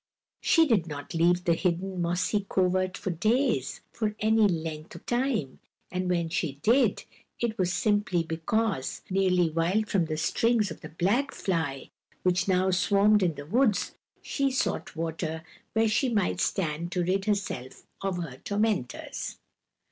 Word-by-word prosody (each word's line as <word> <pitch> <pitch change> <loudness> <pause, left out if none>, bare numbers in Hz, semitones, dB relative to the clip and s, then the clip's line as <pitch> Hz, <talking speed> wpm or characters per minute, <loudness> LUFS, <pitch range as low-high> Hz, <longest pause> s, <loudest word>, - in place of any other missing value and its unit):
She 330 -2 +5
did 215 - +2
not 145 -2 -7
leave 175 +2 +3
the 170 - +3
hidden, 180 +2 -1
mossy 180 +4 0
covert 185 0 +1
for 190 - -3
days, 215 - +1
for 215 -2 -2
any 220 0 +4
length 160 -3 -4
of - - -11
time, 240 - -1 0.3
and 185 0 -2
when 170 -2 +1
she 160 -3 -1
did, 250 +5 +3 0.4
it 235 -2 -1
was 180 -1 +2
simply 205 -3 +1
because, 165 0 -1
nearly 180 -3 +2
wild 180 +7 +1
from 185 -4 +2
the 155 -1 -3
stings 225 +4 +1
of - - -9
the - - -8
black 205 - +1
fly, 160 -7 -2 0.3
which 180 +1 +2
now 185 0 +3
swarmed 200 +3 +4
in 175 -4 +1
the 145 - -8
woods, 210 - +2 0.3
she 275 -1 0
sought 260 -8 -2
water 160 0 -3 0.3
where 225 0 +3
she 235 +5 +2
might 205 -6 0
stand 170 -1 -1
to 180 - +1
rid 190 +2 0
herself 195 -12 -3 0.2
of 195 -2 -1
her 160 -8 -5
tormentors. 205 - -2
185 Hz, 155 wpm, -28 LUFS, 165-215 Hz, 0.4 s, She